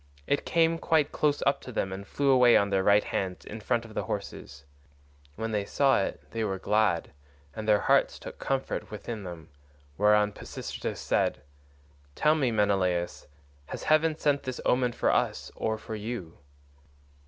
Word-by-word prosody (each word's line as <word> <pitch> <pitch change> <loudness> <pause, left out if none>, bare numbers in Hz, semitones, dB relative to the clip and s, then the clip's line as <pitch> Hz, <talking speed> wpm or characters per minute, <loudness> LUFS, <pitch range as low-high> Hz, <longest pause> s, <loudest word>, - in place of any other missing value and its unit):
It 140 - 0
came 165 0 +2
quite 160 -4 +2
close 145 -1 +1
up 140 - +2
to 125 - -9
them 95 -4 -2
and 100 +1 -7
flew 140 -1 +1
away 125 -2 +6
on 100 0 +1
their 95 -1 +2
right 100 +2 +4
hands 95 -2 -3
in 110 - -7
front 115 +2 -1
of 110 - -12
the - - -2
horses. 70 0 -6 0.7
When 115 +5 -3
they 105 -2 0
saw 135 +3 +2
it - - -4
they 115 -1 -2
were 95 -3 -1
glad, 105 -3 +1 0.4
and 110 0 -5
their 105 -1 +4
hearts - - +3
took - - -10
comfort 135 -1 -2
within 105 +1 -6
them, 85 -3 -9 0.5
whereon 105 0 +4
Pisistratus - - -6
said, 65 - 0 0.7
"Tell 150 - +4
me, 145 -5 +1
Menelaus, 95 -5 0 0.4
has - - -6
heaven 155 0 +3
sent 145 -3 +1
this 130 -1 -5
omen 125 -1 +2
for - - +1
us - - 0
or 110 0 -1
for 110 - -8
you?" 105 -6 -6
110 Hz, 170 wpm, -28 LUFS, 100-135 Hz, 0.7 s, away